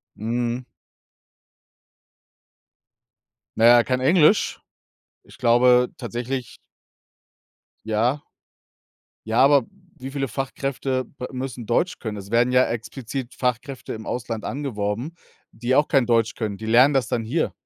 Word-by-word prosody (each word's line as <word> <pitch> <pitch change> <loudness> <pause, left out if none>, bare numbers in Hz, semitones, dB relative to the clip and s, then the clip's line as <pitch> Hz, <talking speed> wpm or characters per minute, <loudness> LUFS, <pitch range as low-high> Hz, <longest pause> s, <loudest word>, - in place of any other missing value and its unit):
Mhm. 120 +3 -2 2.9
Na 115 - +4
ja, 120 0 +7
kein 125 +1 -1
Englisch? 165 +7 +3 0.6
Ich - - -17
glaube 125 0 +4
tatsächlich 125 +1 -5 1.3
Ja. 120 +7 0 1.0
Ja, 110 +2 +1
aber 140 -3 +5 0.3
wie 135 -1 -7
viele 135 -1 -2
Fachkräfte 135 +1 -3
b 125 - -9
müssen 130 -2 -5
Deutsch 165 - 0
können? 110 -3 -5
Es 100 0 -9
werden 120 +2 +2
ja 130 0 +5
explizit 120 +2 -5
Fachkräfte 125 +1 -3
im 110 -1 -8
Ausland 115 -3 -4
angeworben, 120 0 -3 0.4
die 120 +3 -2
auch 145 - +4
kein 135 -5 +3
Deutsch 115 -1 +1
können. 105 -4 -3
Die 110 - -7
lernen 125 +6 +5
das 130 -4 +1
dann 115 -3 -1
hier. 150 +9 -1
125 Hz, 120 wpm, -23 LUFS, 115-135 Hz, 2.9 s, ja